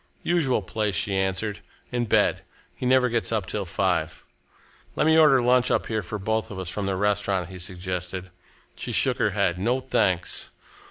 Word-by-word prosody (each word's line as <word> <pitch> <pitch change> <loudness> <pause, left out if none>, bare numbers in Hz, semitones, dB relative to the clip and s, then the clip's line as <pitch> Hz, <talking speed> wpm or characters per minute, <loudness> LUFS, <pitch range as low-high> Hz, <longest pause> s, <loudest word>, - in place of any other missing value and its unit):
"Usual 145 - +1
place," 105 0 -2
she 100 +4 -1
answered, 95 +2 -1 0.3
"in 120 -1 0
bed. 105 - +2 0.3
He 125 - -4
never 130 0 +4
gets 115 -5 -1
up 110 -4 0
till 100 +3 -3
five." 90 -3 -1 0.7
"Let - - +2
me 160 0 +5
order 145 -6 +6
lunch 125 +1 +4
up - - +1
here 110 -1 -1
for 105 +3 -5
both 110 +2 -1
of 100 - -7
us, 95 -2 -4
from 100 +1 -3
the 95 - 0
restaurant," 100 -2 0
he 95 -1 -9
suggested. 90 0 -5 0.4
She - - -5
shook - - +2
her - - +3
head. 90 +1 +1
"No, 120 +7 +1
thanks!" 95 -9 0
100 Hz, 180 wpm, -25 LUFS, 95-120 Hz, 0.7 s, order